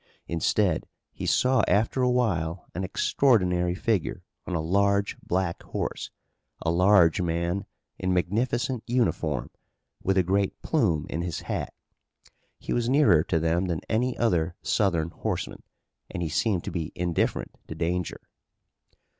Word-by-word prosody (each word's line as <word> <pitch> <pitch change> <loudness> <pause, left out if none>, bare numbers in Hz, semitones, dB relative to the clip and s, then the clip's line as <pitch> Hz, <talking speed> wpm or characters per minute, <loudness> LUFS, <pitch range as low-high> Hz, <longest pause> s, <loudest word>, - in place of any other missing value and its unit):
Instead 85 +1 +1 0.2
he - - -5
saw 130 +1 +3
after 110 +5 +2
a 125 - +3
while 90 -9 0
an 90 - -3
extraordinary 90 -4 +2
figure 105 -2 -1 0.2
on 90 - -2
a - - +1
large 100 +4 +2
black 90 -1 -1
horse, - - -4 0.5
a 80 - +1
large 90 -1 +5
man 85 +2 -1 0.3
in 95 - 0
magnificent 120 +7 0
uniform, 110 - 0 0.5
with 95 0 +1
a 95 - +5
great 95 +2 0
plume 90 - +1
in 80 - -3
his 85 -1 -3
hat. - - -3 0.9
He - - -4
was 120 0 0
nearer 110 - +5
to 80 - +1
them 85 +3 +1
than 85 -3 -2
any 125 +3 0
other 85 -7 +1
Southern 85 -5 +1
horseman, - - -4 0.5
and 85 - -4
he 80 - -2
seemed 100 +1 +1
to - - -4
be 85 -3 -3
indifferent 85 -1 -1
to 80 - -6
danger. 85 +2 -2
90 Hz, 140 wpm, -26 LUFS, 85-110 Hz, 0.9 s, large